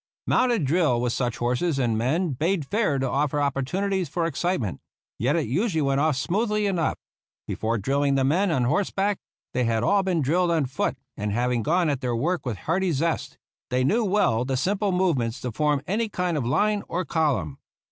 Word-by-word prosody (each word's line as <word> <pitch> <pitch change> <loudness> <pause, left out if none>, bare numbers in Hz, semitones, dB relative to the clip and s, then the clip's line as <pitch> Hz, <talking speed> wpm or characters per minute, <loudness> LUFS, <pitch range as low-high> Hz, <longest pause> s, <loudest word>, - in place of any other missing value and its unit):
Mounted 240 - +2
drill 150 -4 +2
with 120 -1 0
such 120 -3 -1
horses 125 +6 0
and 120 -4 +1
men 150 +10 0
bade 160 +4 0
fair 205 -4 +1
to 135 0 0
offer 145 +2 0
opportunities 170 +7 -1
for 170 +3 -1
excitement; 165 - -2 0.4
yet 130 +8 +1
it 165 - +1
usually 160 - 0
went 140 0 +1
off 155 -2 +2
smoothly 210 - 0
enough. 180 -5 0 0.5
Before 115 +1 -1
drill 135 +7 0
ing 140 -1 +2
the 135 - +2
men 175 +9 +2
on 130 -7 +1
horseback 195 +8 0 0.3
they 125 - +1
had 115 0 +1
all 200 +6 +3
been 180 -5 0
drilled 175 +6 +2
on 160 -4 +2
foot, 130 0 -2 0.2
and 105 0 -3
having 120 +2 0
gone 170 +6 +2
at 140 -3 -1
their 125 -2 -1
work 160 +5 -1
with 115 -5 -2
hearty 180 - 0
zest, 160 +3 -1 0.3
they 125 0 +1
knew 220 - +2
well 185 - +2
the 130 0 -1
simple 200 +7 0
move 180 -6 +2
ments 115 +1 -2
to 125 - -3
form 150 +2 0
any 215 +5 -1
kind 180 -4 -1
of 135 -6 -1
line 210 +10 +2
or 180 +1 -2
column. 135 - 0
150 Hz, 200 wpm, -25 LUFS, 125-185 Hz, 0.5 s, all